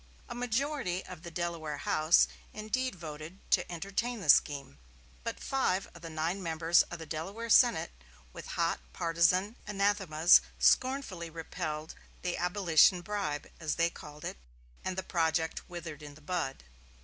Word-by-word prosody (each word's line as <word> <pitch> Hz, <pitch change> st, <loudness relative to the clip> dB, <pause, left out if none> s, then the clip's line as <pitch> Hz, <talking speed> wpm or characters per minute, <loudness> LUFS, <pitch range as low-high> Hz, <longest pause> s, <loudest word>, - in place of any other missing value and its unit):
A 240 Hz, -, -6 dB
majority 245 Hz, -5 st, -1 dB
of 180 Hz, -3 st, -9 dB
the 170 Hz, -, -8 dB
Delaware 165 Hz, -3 st, -3 dB
House 155 Hz, +3 st, +4 dB, 0.3 s
indeed 215 Hz, +3 st, -2 dB
voted 155 Hz, +1 st, -8 dB
to -, -, +2 dB
entertain 200 Hz, +7 st, -2 dB
the 185 Hz, -, -6 dB
scheme. 140 Hz, -, +4 dB, 0.4 s
But 230 Hz, 0 st, -4 dB
five 195 Hz, -8 st, 0 dB
of 170 Hz, -, -13 dB
the 165 Hz, -, -7 dB
nine 165 Hz, +5 st, -2 dB
members 165 Hz, 0 st, +3 dB
of 175 Hz, -, -6 dB
the 165 Hz, -, -8 dB
Delaware 195 Hz, +10 st, -5 dB
Senate, 240 Hz, -, +5 dB, 0.4 s
with -, -, -9 dB
hot -, -, +1 dB
partizan 170 Hz, -, +2 dB
anathemas, 195 Hz, -5 st, +4 dB, 0.2 s
scornfully 255 Hz, -11 st, +2 dB
repelled 155 Hz, -1 st, -5 dB, 0.3 s
the 180 Hz, -1 st, -1 dB
"abolition 180 Hz, -1 st, +4 dB
bribe," 190 Hz, -7 st, -3 dB
as 155 Hz, -2 st, -1 dB
they 170 Hz, 0 st, +2 dB
called 150 Hz, -2 st, -11 dB
it, -, -, -5 dB, 0.5 s
and 185 Hz, 0 st, -3 dB
the 190 Hz, -, -1 dB
project 160 Hz, -2 st, -1 dB
withered 165 Hz, -4 st, -7 dB
in 145 Hz, -1 st, -10 dB
the 155 Hz, -, -16 dB
bud. 150 Hz, -, -3 dB
175 Hz, 150 wpm, -31 LUFS, 160-200 Hz, 0.5 s, Senate